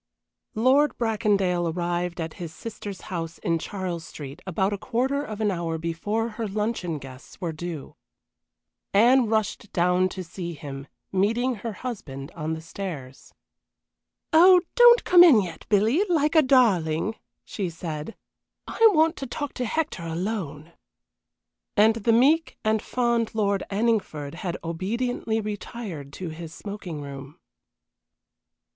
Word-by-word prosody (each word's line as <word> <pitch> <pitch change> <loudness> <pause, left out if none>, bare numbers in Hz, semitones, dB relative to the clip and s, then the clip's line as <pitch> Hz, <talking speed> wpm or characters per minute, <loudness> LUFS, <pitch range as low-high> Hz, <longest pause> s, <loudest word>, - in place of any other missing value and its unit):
XXI 220 - -2
Lord 280 +4 +4
Bracondale 200 -7 +1
arrived 175 +1 -2
at 160 -1 -4
his 170 -2 -5
sister's 205 +1 -7
house 165 -1 -4
in 165 -1 0
Charles 180 -2 -4
Street 145 0 -9
about 190 +3 0
a - - -2
quarter 255 +5 0
of 215 -6 -6
an 210 -2 +2
hour 170 -3 -2
before 205 +8 -2
her 225 0 -4
luncheon 205 -5 -2
guests 135 -1 -12
were 175 -4 -2
due. 160 -2 -7 1.0
Anne 240 +4 +5
rushed 215 -2 -1
down 180 +1 +2
to 185 0 -6
see 170 0 -6
him, 140 -1 -8 0.2
meeting 230 +7 +1
her 230 -2 -4
husband 170 - -7
on 160 -1 -4
the 160 - -5
stairs. 160 -7 -7 1.0
"Oh, 360 +3 +8
don't 485 0 +7
come 355 -1 +8
in 300 -11 +8
yet, 175 -5 -5
Billy, 220 - +3
like 305 -3 +2
a 320 - +7
darling," 215 - +3 0.3
she 195 -4 -3
said, 160 +2 -6 0.5
"I - - -2
want 320 0 +4
to 270 - -5
talk 290 +3 -4
to 250 - -3
Hector 310 - -2
alone." 165 -2 -4 1.0
And 220 +2 +5
the 230 +1 +1
meek 290 +8 +3
and 215 0 +2
fond 235 -3 0
Lord 200 -3 +1
Anningford 200 -9 -1
had 175 +1 -4
obediently 220 +7 -2
retired 205 - -6
to 180 +1 -5
his 160 0 -8
smoking 195 -7 -6
room. 140 +2 -9
195 Hz, 140 wpm, -25 LUFS, 165-230 Hz, 1.0 s, Oh